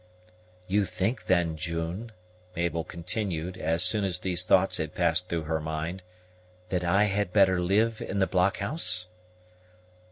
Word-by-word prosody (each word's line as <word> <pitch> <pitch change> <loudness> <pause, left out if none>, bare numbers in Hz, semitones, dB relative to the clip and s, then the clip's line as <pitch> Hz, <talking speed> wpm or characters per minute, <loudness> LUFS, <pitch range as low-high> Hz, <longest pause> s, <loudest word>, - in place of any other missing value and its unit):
"You 100 +2 +1
think, 100 +7 -2
then, 85 -3 +2
June," 85 +7 -4 0.4
Mabel 85 -1 -1
continued, 90 0 -4
as 85 -1 +1
soon 100 +3 +3
as 95 -3 +1
these 90 -1 0
thoughts 95 +1 +3
had 80 -1 -4
passed 90 +1 +1
through 85 -2 -2
her 80 +1 -1
mind, 80 +4 -4 0.7
"that 90 -1 -1
I 95 +4 +3
had 100 -2 0
better 95 -2 +4
live 110 +5 +1
in 100 - -4
the 95 - +3
blockhouse?" 100 - +1
90 Hz, 140 wpm, -27 LUFS, 85-100 Hz, 0.7 s, better